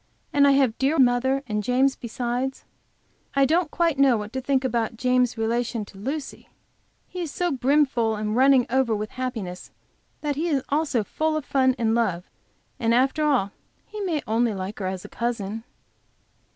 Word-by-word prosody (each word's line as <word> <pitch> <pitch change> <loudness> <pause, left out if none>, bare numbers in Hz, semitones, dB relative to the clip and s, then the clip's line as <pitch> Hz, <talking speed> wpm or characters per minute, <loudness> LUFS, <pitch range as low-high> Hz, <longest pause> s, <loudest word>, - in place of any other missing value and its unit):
And 280 -1 +5
I 280 - +5
have 265 -5 +2
dear 280 +4 +2
mother 260 +1 +3
and 210 -2 -2
James 255 +5 +2
besides. 245 +3 -3 0.7
I 275 0 +5
don't 325 +3 +2
quite 330 -3 0
know 270 -4 +5
what 210 +1 -6
to 260 - -2
think 270 0 +1
about 230 -2 -1
James' 250 0 +1
relation 230 0 -1
to 200 - -15
Lucy. 275 +6 -5 0.6
He 365 - -6
is 335 - -3
so 355 +4 -1
brimful 260 -4 +2
running 245 +5 +3
over 260 -4 +2
with 210 +1 -4
happiness 225 -9 -5 0.5
that 295 -1 -1
he 320 +5 -1
is 280 -5 0
also 285 -5 +1
full 310 +8 -1
of 300 - -5
fun 260 -2 +2
and 230 -2 0
of - - +2
love, 190 -7 -1 0.5
and 230 -1 +2
after 270 +5 +2
all 260 -10 +2 0.3
he 425 - -8
may 335 -7 -1
only 225 0 +1
like 190 +3 -5
her 190 - -2
as 185 -1 -5
a - - -6
cousin. 225 -2 -3
255 Hz, 180 wpm, -24 LUFS, 225-275 Hz, 0.7 s, And